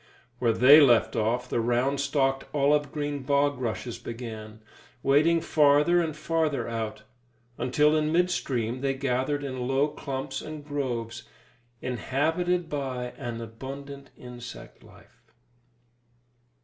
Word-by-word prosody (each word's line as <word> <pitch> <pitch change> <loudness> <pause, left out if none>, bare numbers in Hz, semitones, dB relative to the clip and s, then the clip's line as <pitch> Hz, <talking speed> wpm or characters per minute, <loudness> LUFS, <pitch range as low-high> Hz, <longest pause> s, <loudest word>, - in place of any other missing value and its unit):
Where 120 -2 +3
they 135 +7 +8
left 120 -5 +4
off, 120 +3 0
the 120 - -1
round 125 +4 +1
stalked 135 -1 0
olive 145 0 +2
green 145 -1 -3
bog 140 0 +1
rushes 120 0 -4
began, 110 -2 -8 0.4
wading 155 +5 +4
farther 150 +4 +4
and 160 -3 -3
farther 155 -2 -1
out, 110 -2 -4 0.6
until 150 +5 +3
in 155 0 +1
midstream 130 -9 0
they 135 -1 0
gathered 135 +2 -1
in 130 -3 -4
low 135 +3 +2
clumps 135 -2 -5
and 155 -1 -8
groves, 125 -6 -4 0.6
inhabited 160 - 0
by 130 -4 -4
an 120 -3 -5
abundant 135 +4 -8
insect 125 -1 -10
life. - - -19
135 Hz, 120 wpm, -27 LUFS, 125-145 Hz, 0.6 s, they